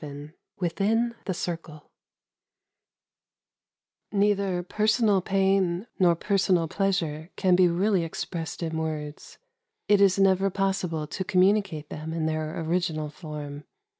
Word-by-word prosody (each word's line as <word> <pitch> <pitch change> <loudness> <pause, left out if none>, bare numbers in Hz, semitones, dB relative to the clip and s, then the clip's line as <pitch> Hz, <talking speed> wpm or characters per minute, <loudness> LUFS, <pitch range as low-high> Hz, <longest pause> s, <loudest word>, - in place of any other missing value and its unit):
XI 145 +1 -8 0.3
■WITHIN 215 +7 +1
THE 190 - -1
CIRCLE 165 -4 -6 2.2
Neither 200 -3 +1
personal 215 +1 +2
pain 190 -1 +1
nor 175 -2 +5
personal 185 -2 +1
pleas 195 +2 +1
ure 155 +1 -6
can 185 -2 +3
be 180 0 +5
really 185 +2 +1
expressed 165 +1 -5
in 160 -1 -2
words. 155 -2 -5 0.5
It 205 -1 +4
is 195 -1 +5
never 195 0 +3
possible 190 -5 -1
to 170 +5 -4
communicate 190 -4 +2
tbem 160 +2 -6
in 160 -1 -1
their 155 0 -2
original 160 -2 -1
form. 150 -2 -8
180 Hz, 120 wpm, -26 LUFS, 160-195 Hz, 2.2 s, nor